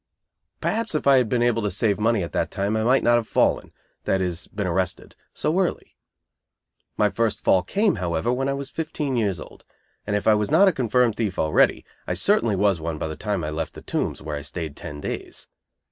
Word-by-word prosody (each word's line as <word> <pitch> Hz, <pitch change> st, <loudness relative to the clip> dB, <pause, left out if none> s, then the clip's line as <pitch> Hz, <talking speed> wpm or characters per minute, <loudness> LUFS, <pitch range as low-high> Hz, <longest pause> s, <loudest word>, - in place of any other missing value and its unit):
Perhaps 225 Hz, -6 st, -1 dB
if 155 Hz, -, -1 dB
I 140 Hz, -1 st, +6 dB
had 125 Hz, -4 st, +2 dB
been 120 Hz, 0 st, +1 dB
able 120 Hz, -1 st, +2 dB
to 105 Hz, -, 0 dB
save 100 Hz, +2 st, +1 dB
money 110 Hz, -2 st, +2 dB
at 85 Hz, -, -6 dB
that -, -, -1 dB
time 100 Hz, +2 st, -1 dB
I 110 Hz, -, 0 dB
might 130 Hz, +4 st, +3 dB
not 120 Hz, 0 st, +5 dB
have 115 Hz, -2 st, -2 dB
fallen -, -, +1 dB, 0.3 s
(that 95 Hz, -, +1 dB
is, 90 Hz, -2 st, -3 dB
been 100 Hz, -1 st, -4 dB
arrested) 90 Hz, 0 st, -2 dB, 0.2 s
so 160 Hz, +5 st, 0 dB
early. 185 Hz, -, -2 dB, 1.0 s
My 105 Hz, -1 st, +3 dB
first 115 Hz, -2 st, -1 dB
fall 95 Hz, -, +4 dB
came, 200 Hz, -, +1 dB
however, 85 Hz, +6 st, -1 dB
when 135 Hz, +2 st, -1 dB
I 135 Hz, -, 0 dB
was 140 Hz, -1 st, -6 dB
fifteen 155 Hz, -4 st, -3 dB
years 100 Hz, -7 st, 0 dB
old; -, -, -12 dB, 0.4 s
and 105 Hz, -, 0 dB
if 105 Hz, -, -1 dB
I 110 Hz, -, +6 dB
was 105 Hz, -1 st, 0 dB
not 200 Hz, -, +6 dB
a -, -, +6 dB
confirmed 125 Hz, -3 st, +1 dB
thief 105 Hz, -5 st, -2 dB
already, 80 Hz, -1 st, +2 dB, 0.2 s
I -, -, -1 dB
certainly 115 Hz, -3 st, +2 dB
was 95 Hz, -2 st, +2 dB
one 80 Hz, -1 st, -3 dB
by 80 Hz, -, -3 dB
the 80 Hz, -, -5 dB
time 100 Hz, -3 st, -2 dB
I 75 Hz, -, -3 dB
left 80 Hz, +1 st, -4 dB
the -, -, -10 dB
Tombs, -, -, -3 dB
where 75 Hz, -1 st, -4 dB
I 75 Hz, -, -4 dB
stayed 80 Hz, 0 st, -6 dB
ten 75 Hz, -1 st, -8 dB
days. -, -, -6 dB
105 Hz, 220 wpm, -24 LUFS, 90-125 Hz, 1.0 s, I